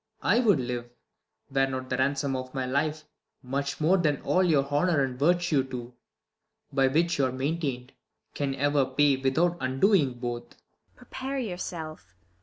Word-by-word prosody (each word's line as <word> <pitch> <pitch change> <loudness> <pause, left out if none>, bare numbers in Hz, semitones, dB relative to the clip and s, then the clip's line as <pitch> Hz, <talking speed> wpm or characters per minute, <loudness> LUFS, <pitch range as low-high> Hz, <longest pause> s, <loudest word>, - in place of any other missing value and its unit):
I - - +4
would 210 - +4
live, 120 -1 -4 0.6
Were 135 0 +2
not 130 -1 -5
the 125 - +1
ransom 135 0 0
of 130 0 -6
my 130 -1 -1
life 150 +4 -1 0.4
much 140 +2 -3
more 165 +5 +4
Than 150 -5 +1
all 185 - +2
your 150 -6 +3
honour 145 +2 +2
and 135 - -1
your 170 +5 +6
virtue 175 -6 +1
too, 125 -2 -7 0.8
By 135 -1 +4
which 165 +4 +1
you 135 - +4
are - - -3
maintain'd, 135 -2 -3 0.4
can 140 -2 -2
ever 145 +1 +2
pay, 135 +2 +3
Without 160 +7 +1
undoing 135 - +2
both. 120 -1 -5
ISAB. - - -39
Prepare 265 +2 -6
j^our 195 -8 -4
self 155 - -7
140 Hz, 170 wpm, -27 LUFS, 130-165 Hz, 0.8 s, your